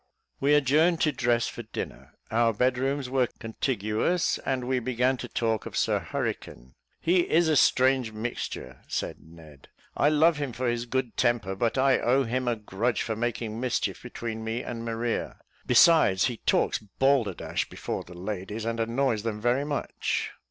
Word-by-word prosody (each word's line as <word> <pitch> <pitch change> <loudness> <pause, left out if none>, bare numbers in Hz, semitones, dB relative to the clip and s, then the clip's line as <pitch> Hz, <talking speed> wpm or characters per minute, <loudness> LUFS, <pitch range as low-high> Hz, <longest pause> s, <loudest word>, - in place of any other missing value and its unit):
We 145 +2 +4
adjourned 155 +4 +3
to 155 - +3
dress 120 -3 +1
for - - -6
dinner; 110 - -7 0.2
our 115 0 +3
bed 125 +3 +1
rooms 135 0 -1
were 130 -1 +1
contiguous, 115 - -1
and 130 -2 -2
we 130 0 +1
began 125 +2 +1
to - - -6
talk 115 -2 -1
of - - -6
Sir - - +2
Hurricane. 65 +2 -5 0.3
"He 180 +2 +3
is 170 +1 +4
a 155 - +3
strange 130 -3 +3
mixture," 110 - -5
said - - -3
Ned. 80 -4 -16 0.3
"I 145 - +3
love 155 +1 +4
him 145 -4 -3
for 125 +2 -2
his 120 0 -1
good 130 -1 -2
temper; 115 -5 +1
but 115 +5 0
I 130 0 +4
owe 130 +3 +3
him 125 +1 -2
a 120 - +2
grudge 110 +3 -1
for 110 - -2
making 115 -1 -3
mischief 125 -1 -1
between 110 -1 -6
me 115 +2 -3
and 115 -1 -5
Maria; 115 0 -2 0.3
besides, 125 - +6
he 120 -3 -2
talks - - +2
balderdash 115 -2 0
before - - -4
the 90 0 -12
ladies, 105 +3 -5
and 115 0 -2
annoys 115 0 0
them 110 -1 -3
very 120 +5 +1
much." 145 -1 -2
120 Hz, 170 wpm, -27 LUFS, 110-130 Hz, 0.3 s, besides